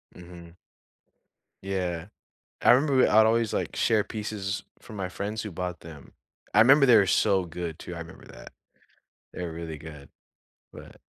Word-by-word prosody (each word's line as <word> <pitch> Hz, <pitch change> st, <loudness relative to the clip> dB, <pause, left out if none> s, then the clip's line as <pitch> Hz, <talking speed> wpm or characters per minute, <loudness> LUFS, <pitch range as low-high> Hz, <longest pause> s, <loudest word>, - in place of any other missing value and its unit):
Mhm. 85 Hz, -1 st, -13 dB, 1.1 s
Yeah, 90 Hz, -3 st, -3 dB, 0.5 s
I -, -, +6 dB
remember 135 Hz, 0 st, +3 dB
I'd 110 Hz, +1 st, +5 dB
always, 115 Hz, -1 st, +1 dB
like, -, -, -3 dB
share 110 Hz, -2 st, +2 dB
pieces 105 Hz, -2 st, -5 dB, 0.2 s
from 110 Hz, -, -12 dB
my 95 Hz, -2 st, -3 dB
friends 105 Hz, +3 st, -5 dB
who 105 Hz, -, -6 dB
bought 90 Hz, 0 st, -5 dB
them, 80 Hz, -4 st, -13 dB, 0.4 s
I 105 Hz, -, +2 dB
remember 135 Hz, +4 st, +6 dB
they 120 Hz, -3 st, +7 dB
were 100 Hz, -, +5 dB
so 95 Hz, 0 st, +2 dB
good 85 Hz, -1 st, -6 dB
too. 90 Hz, -, -8 dB
I -, -, -7 dB
remember 85 Hz, 0 st, -11 dB
that. -, -, -13 dB, 0.8 s
They're 90 Hz, -2 st, -5 dB
really 80 Hz, -2 st, -7 dB
good, 75 Hz, -3 st, -11 dB, 0.6 s
but -, -, -14 dB
95 Hz, 155 wpm, -26 LUFS, 85-110 Hz, 1.1 s, they